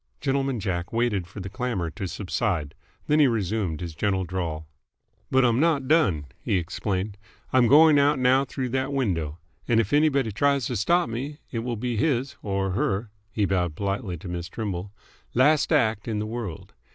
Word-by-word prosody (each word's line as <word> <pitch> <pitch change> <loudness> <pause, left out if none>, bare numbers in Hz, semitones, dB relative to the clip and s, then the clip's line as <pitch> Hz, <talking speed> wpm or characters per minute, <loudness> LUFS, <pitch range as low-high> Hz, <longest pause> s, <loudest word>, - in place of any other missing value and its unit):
Gentleman 135 -2 0
Jack 90 -4 -3
waited 115 -6 0
for 100 - -9
the 95 - -5
clamour 110 -8 -2
to 95 - -5
subside. 75 -4 -2 0.3
Then 150 +1 +3
he 145 - +6
resumed 105 -7 -1
his 85 -2 -5
gentle 95 +2 0
drawl. 85 -4 -3 0.6
"But 130 -1 +4
I'm 120 0 +3
not 150 -4 +2
done," 115 - +3
he - - 0
explained. 95 +3 -3 0.3
"I'm 130 -2 +5
going 150 +2 +7
out 145 +1 +3
now 130 +1 +4
through 130 -1 -4
that 130 +2 -1
window. 85 - -1 0.3
And 115 -1 +3
if 110 +1 0
anybody 140 -6 +3
tries 140 +4 +2
to 125 - -2
stop 170 - +2
me, 130 +6 -5
it 115 - -2
will 120 0 -3
be 120 +1 -2
his 135 0 0
or 95 -2 -1
her 100 +3 -1
" 105 +1 -42
he 105 0 +1
bowed 90 -4 0
politely 100 -1 -2
to 80 - -10
Miss 85 0 -4
Trimble 100 -2 -4 0.4
"last 145 +6 +4
act 110 -8 +2
in 110 -2 -1
the 105 - -2
world. 110 -7 -6
110 Hz, 185 wpm, -25 LUFS, 95-130 Hz, 0.6 s, going